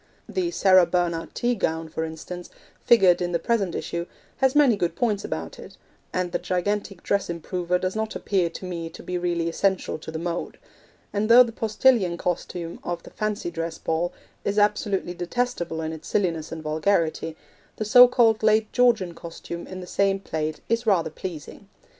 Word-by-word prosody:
The 360 -2 -1
Sarah 185 - +5
Bernhardt 170 -2 -1
tea 245 +1 +1
gown, 160 -7 -1
for 160 0 -4
instance, 160 +2 -7 0.3
figured 190 -7 +5
in 175 0 -1
the - - +3
present 195 -1 0
issue, 170 +1 -3 0.3
has 265 0 +2
many 285 -6 +6
good 175 -4 -1
points 210 -3 0
about 80 +1 -5
it, - - -12 0.3
and 180 -1 -1
the - - -1
gigantic 195 +1 -2
dress 200 -2 0
improver 175 +1 -1
does 185 +2 -2
not 220 0 -2
appear 185 -4 0
to 185 - -8
me 170 -2 -4
to - - -12
be 180 0 -3
really 170 -1 -1
essential 190 0 0
to 160 - -9
the 160 - -4
mode; 170 +1 -4 0.6
and 210 +2 0
though 245 +2 +9
the 235 - -5
Postillion 220 -4 +2
costume 170 -1 -3
of 175 -1 -4
the - - -12
fancy 210 -4 -3
dress 165 -1 -4
ball 165 +2 -1 0.3
is 200 +1 -1
absolutely 205 -3 +1
detestable 175 -3 -2
in 160 0 -3
its 160 0 -9
silliness 170 -6 -1
and 160 -1 -6
vulgarity, 160 0 0 0.4
the 215 - -3
so 245 +4 +9
called 230 -3 +3
Late 215 0 +3
Georgian 230 -8 +3
costume 170 0 -8
in 185 0 -7
the - - -7
same 195 +1 +1
plate 155 -4 -3
is 230 +1 0
rather 180 -7 +2
pleasing. 160 -2 -8
180 Hz, 180 wpm, -25 LUFS, 170-210 Hz, 0.6 s, though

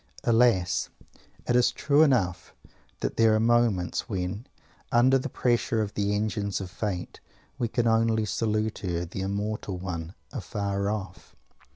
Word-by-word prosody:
_ - - -38 0.2
Alas! 115 -7 +3 0.6
It 120 - +2
is 125 -1 +4
true 145 +1 +2
enough 110 - +1 0.5
that - - -2
there 115 -1 +5
are - - +2
moments, 115 -4 +1
when, 95 +4 -3 0.4
under 130 +2 +5
the - - -4
pressure 120 -2 +1
of 105 -1 -2
the 100 0 0
engines 105 -1 -1
of 95 -2 -6
fate, 95 -2 -4 0.4
we 120 - +1
can 120 +1 0
only 115 -1 +2
salute 110 0 -1
her 90 -2 -2
the 90 +3 -6
immortal 100 0 -3
one 90 -1 -5 0.2
afar 100 - -2
off. 100 -3 -6
105 Hz, 150 wpm, -27 LUFS, 95-115 Hz, 0.6 s, there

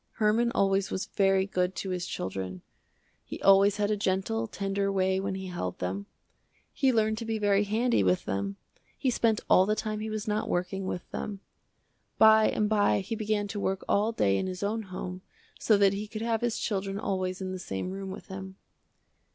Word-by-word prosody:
Herman 225 +2 +2
always 195 0 +2
was 190 - -2
very 195 -1 +2
good 185 -1 -1
to 190 - -4
his 180 -1 -3
children. 95 -1 -5 0.6
He - - -8
always 195 +1 +6
had 210 0 +1
a - - +2
gentle, 205 +3 -1
tender 200 -1 -1
way 190 -1 +1
when 195 0 -2
he 190 0 -5
held 175 - -4
them. 95 +2 -4 0.7
He 270 - +3
learned 220 -2 +1
to - - -4
be 225 0 -1
very 205 -1 +3
handy 230 - +2
with 90 -1 +1
them. 100 0 -2 0.4
He 260 - +1
spent 225 -2 +1
all 185 - +5
the 215 - +2
time 215 -1 -3
he 220 +1 -4
was 215 -1 -4
not 210 0 -1
working, 185 +2 -2
with 180 - -4
them. 200 -2 -5 0.8
By 220 0 +7
and 210 - +1
by 205 -2 +3
he 225 +4 -4
began 215 -1 -1
to 205 - -4
work 190 -1 -1
all 210 +3 +2
day 100 - +2
in 190 - -1
his 185 +1 -5
own 220 +3 -1
home 185 0 -6 0.4
so 215 - +4
that 200 -1 +4
he 205 +2 -4
could 215 +1 -5
have 230 -1 0
his 240 -2 0
children 195 -2 -2
always 185 -3 -2
in 190 -1 -4
the 185 - -5
same 95 - -4
room 195 0 -5
with 190 +2 -8
him. 190 0 -8
195 Hz, 200 wpm, -28 LUFS, 185-215 Hz, 0.8 s, By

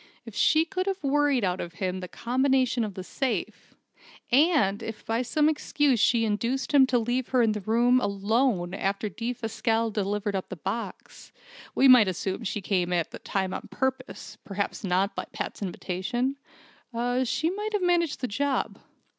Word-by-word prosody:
If 230 - -9
she 315 +9 +3
could 370 +2 -3
have 390 -3 -2
worried 285 -3 +2
out 180 -1 0
of 170 - -6
him 185 +1 -3
the 180 - -6
combination 255 +2 +1
of 205 -3 -5
the 185 - -5
safe 260 +6 -3 0.6
and 265 - +3
if 225 -1 -7
by 225 +2 0
some 295 +5 +2
excuse 290 -4 +1
she 230 +2 +3
induced 235 +5 -1
him 270 -2 +7
to 250 - +2
leave 240 +2 -1
her 255 -2 +3
in 225 - +3
the 210 -1 -3
room 240 +5 +3
alone 200 -3 0
after 200 +2 -1
Defasquelle 230 0 -1
delivered 205 0 -1
up 190 - -3
the - - -5
box 195 +8 -6 0.4
(we 270 - +5
might 250 -5 +8
assume 190 +4 -3
she 205 +1 -2
came 180 -2 0
at 170 -2 0
that - - -10
time 190 -1 -1
on - - -6
purpose, 265 0 -4
perhaps 200 +2 -4
not 190 +2 +1
by - - -3
Pat's - - -5
invitation) 200 +8 -2 0.9
she 310 +7 0
might 420 +3 -4
have 410 -3 0
managed 340 -5 +1
the 250 - -1
job. 275 +6 -1
230 Hz, 170 wpm, -27 LUFS, 200-265 Hz, 0.9 s, might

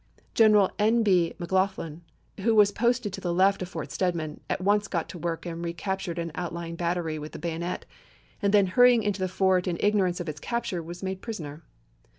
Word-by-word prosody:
General 210 -3 +5
N. 225 +2 +3
B. 180 -5 +2
McLaughlen, 185 -3 -1 0.4
who 220 +3 +2
was 205 -1 +6
posted 235 -1 0
to - - -6
the 175 - -1
left 190 +3 +3
of 180 - -4
Fort - - -6
Stedman, 170 -5 -2
at - - -1
once 205 +2 +2
got 170 -4 -2
to 175 - -8
work 165 0 -3
and 170 0 -5
recaptured 170 +1 -3
an 170 -1 -3
outlying 170 -1 -5
battery 170 -2 -2
with 150 +1 -8
the - - -6
bayonet, 170 +1 -4 0.6
and 200 -2 +2
then 205 -1 +5
hurrying 245 +4 +5
into 205 -1 -1
the 185 - 0
fort 185 0 +2
in 175 -2 -1
igno 205 +2 +2
rance 180 -1 -2
of 175 - -5
its 150 -1 -5
capture 235 -6 -2
was 175 +3 -9
made 190 0 -3
prisoner. 160 -10 -6
185 Hz, 200 wpm, -27 LUFS, 170-205 Hz, 0.6 s, was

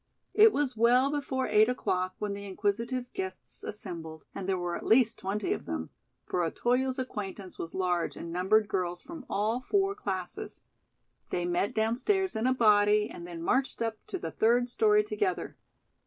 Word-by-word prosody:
It 435 +1 +7
was 280 - 0
well 245 +4 +4
before 275 -3 -1
eight 215 +2 +5
o'clock 185 -7 -1
when 210 -1 -3
the 200 0 -7
inquisitive 230 +6 -2
guests 190 0 -3
assembled, 165 -6 -6
and 195 -1 -5
there 190 - +2
were 175 -1 -2
at - - -6
least 230 -1 +4
twenty 200 +2 -1
of - - -6
them; 80 -1 -4 0.3
for 180 - 0
Otoyo's 250 - 0
acquaintance 205 -6 -5
was 165 - -5
large 180 -2 0
and 170 - -6
numbered 200 +4 +3
girls 180 -4 -2
from 325 - -10
all 215 +5 0
four 390 +7 +1
classes. 200 - -5 0.7
They 175 -1 -1
met 175 +3 0
downstairs 260 - +1
in 220 +3 +1
a 260 - +4
body 210 -2 +4
and 175 - -8
then 170 -1 -7
marched 265 +8 +1
up 225 -1 -3
to 380 - -3
the - - -5
third 245 +2 +2
story 420 - +4
together. 420 -2 -2
215 Hz, 170 wpm, -29 LUFS, 185-255 Hz, 0.7 s, It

